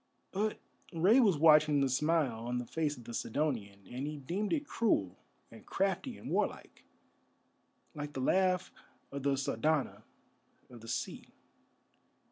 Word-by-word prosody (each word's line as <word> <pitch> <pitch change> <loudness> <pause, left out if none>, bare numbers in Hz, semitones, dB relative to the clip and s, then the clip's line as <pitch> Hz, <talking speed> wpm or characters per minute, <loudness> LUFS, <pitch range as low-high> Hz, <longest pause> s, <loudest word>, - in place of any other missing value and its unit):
But 210 +2 -1 0.3
Rei 190 +9 +5
was 200 - +4
watching 150 -1 +6
the 135 - +3
smile 135 -4 0
on 125 0 -1
the 125 - -3
face 150 +2 -2
of 120 - -11
the 120 +1 -9
Sidonian, 110 -7 -2
and 125 +8 -5
he 150 0 -5
deemed 180 +10 -3
it 300 -2 0
cruel 205 - 0 0.3
and 115 - -13
crafty 195 +5 -1
and - - -8
warlike, - - -2 1.1
like 145 -1 -6
the 135 - -4
laugh 185 +6 +2 0.4
of 140 0 -5
the 140 0 +1
Sardana 140 +2 0 0.7
of 120 -2 -12
the 115 - -11
sea. - - -4
150 Hz, 145 wpm, -32 LUFS, 125-180 Hz, 1.1 s, watching